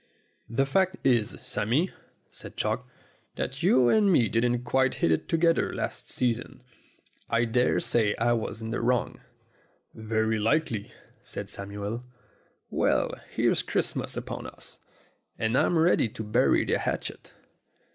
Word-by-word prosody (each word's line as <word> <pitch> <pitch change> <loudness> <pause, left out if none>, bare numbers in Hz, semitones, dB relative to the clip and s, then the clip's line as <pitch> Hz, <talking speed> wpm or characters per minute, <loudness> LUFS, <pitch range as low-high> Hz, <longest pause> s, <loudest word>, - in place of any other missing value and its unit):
"The 130 +4 +1
fact 190 +6 +2
is, 120 -5 +2
Sammy," 140 - 0 0.4
said - - -10
Chalk, 115 +4 -1 0.5
"that - - -4
you 125 -1 +5
and 205 - +4
me 120 - +4
didn't 120 +1 +1
quite 130 +1 +2
hit 80 - +1
it 80 - 0
together 165 0 +2
last - - -4
season. 125 0 -2 0.7
I 115 +1 +2
dare 125 +2 +2
say 105 -3 +1
I 120 +1 +2
was 115 -1 -3
in 110 - -4
the 120 - -2
wrong." 125 +1 0 0.7
"Very 110 0 0
likely," 115 -2 0 0.3
said 100 -1 -6
Samuel. 100 +4 -5 0.7
"Well, - - +1 0.2
here's - - +2
Christmas - - -2
upon - - -5
us, - - -11 0.6
and 110 +1 0
I'm 170 - +3
ready 160 -7 +3
to 110 - -7
bury 120 +5 +3
the - - +1
hatchet." - - -4
120 Hz, 135 wpm, -27 LUFS, 110-130 Hz, 0.7 s, you